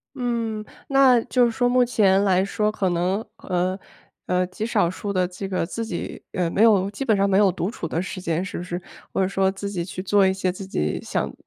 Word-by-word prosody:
嗯， 230 Hz, -4 st, -2 dB, 0.2 s
那 270 Hz, -3 st, +5 dB
就 250 Hz, +1 st, +2 dB
是 235 Hz, -, +1 dB
说 245 Hz, +2 st, +1 dB
目 250 Hz, 0 st, +4 dB
前 200 Hz, -5 st, +3 dB
来 190 Hz, -1 st, +3 dB
说 210 Hz, +2 st, 0 dB
可 200 Hz, -3 st, -1 dB
能， 180 Hz, +5 st, 0 dB
呃 185 Hz, +1 st, -1 dB, 0.5 s
呃， 180 Hz, 0 st, +2 dB
极 200 Hz, +4 st, -5 dB
少 210 Hz, -7 st, +2 dB
数 200 Hz, +3 st, -4 dB
地 185 Hz, -1 st, +2 dB
这 185 Hz, +2 st, -6 dB
个 185 Hz, -3 st, -1 dB
自 230 Hz, +6 st, -4 dB
己， 180 Hz, -6 st, -5 dB
呃， 175 Hz, -2 st, 0 dB
没 205 Hz, -, +2 dB
有 200 Hz, -4 st, +4 dB
基 240 Hz, +7 st, -5 dB
本 220 Hz, -, +3 dB
上 200 Hz, 0 st, +2 dB
没 195 Hz, -, +3 dB
有 205 Hz, -2 st, +5 dB
独 180 Hz, +4 st, -3 dB
处 170 Hz, -, -5 dB
的 165 Hz, -, -1 dB
时 190 Hz, +1 st, -5 dB
间 170 Hz, 0 st, -1 dB
是 185 Hz, -, -5 dB
不 175 Hz, -, -4 dB
是？ 175 Hz, 0 st, -5 dB, 0.3 s
或 -, -, +1 dB
者 185 Hz, -, +2 dB
说 195 Hz, -1 st, +1 dB
自 200 Hz, +1 st, -5 dB
己 175 Hz, -4 st, -3 dB
去 185 Hz, +1 st, -6 dB
做 200 Hz, 0 st, +4 dB
一 190 Hz, -, +2 dB
些 190 Hz, -1 st, -1 dB
自 190 Hz, +1 st, -8 dB
己 75 Hz, -, -1 dB
想， -, -, -2 dB
195 Hz, 255 characters per minute, -23 LUFS, 185-215 Hz, 0.5 s, 那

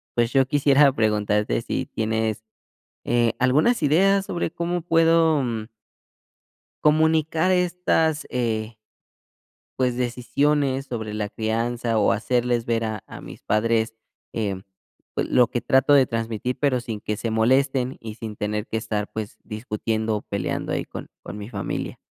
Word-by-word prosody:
pues, 120 Hz, +1 st, +1 dB
yo 135 Hz, -1 st, +4 dB
quisiera 140 Hz, 0 st, +4 dB
preguntarte 105 Hz, -, +1 dB
si -, -, -3 dB
tienes, 110 Hz, -1 st, -1 dB, 0.6 s
eh, 120 Hz, -1 st, +2 dB
algunas 150 Hz, -, +3 dB
ideas 195 Hz, +7 st, +4 dB
sobre 170 Hz, -2 st, -2 dB
cómo 170 Hz, 0 st, -2 dB
puedo, 165 Hz, -3 st, +4 dB
mm 115 Hz, -3 st, -3 dB, 1.2 s
comunicar 160 Hz, +2 st, +3 dB
estas 175 Hz, -3 st, +1 dB
eh 115 Hz, -2 st, -2 dB, 1.0 s
pues, 125 Hz, -2 st, +1 dB
decisiones 135 Hz, +3 st, 0 dB
sobre 110 Hz, -4 st, -5 dB
la 105 Hz, -1 st, -2 dB
crianza 115 Hz, +1 st, -1 dB
o 105 Hz, -, +3 dB
hacerles 120 Hz, 0 st, 0 dB
ver 115 Hz, -1 st, 0 dB
a 110 Hz, -2 st, -4 dB
a -, -, -10 dB
mis -, -, -11 dB
padres, 115 Hz, +1 st, +1 dB, 0.4 s
eh, 100 Hz, -4 st, -2 dB, 0.5 s
pues, -, -, -1 dB
lo 125 Hz, -2 st, +5 dB
que 120 Hz, -, -2 dB
trato 135 Hz, +2 st, +4 dB
de 135 Hz, -3 st, +6 dB
transmitir, 115 Hz, +2 st, -3 dB
pero 130 Hz, -4 st, +2 dB
sin 115 Hz, -4 st, -6 dB
que 105 Hz, 0 st, -3 dB
se 115 Hz, +1 st, -3 dB
molesten 130 Hz, +3 st, +2 dB
y 110 Hz, -2 st, -7 dB
sin 110 Hz, -3 st, -7 dB
tener 105 Hz, +1 st, -2 dB
que 110 Hz, -, -3 dB
estar, 105 Hz, -2 st, -3 dB
pues, 110 Hz, -1 st, -6 dB
discutiendo 110 Hz, 0 st, -2 dB
o 105 Hz, -, -5 dB
peleando 100 Hz, -1 st, -3 dB
ahí -, -, -1 dB
con -, -, -9 dB
con 90 Hz, +5 st, -8 dB
mi 105 Hz, +1 st, -7 dB
familia. 100 Hz, -5 st, -4 dB
120 Hz, 145 wpm, -23 LUFS, 110-140 Hz, 1.2 s, de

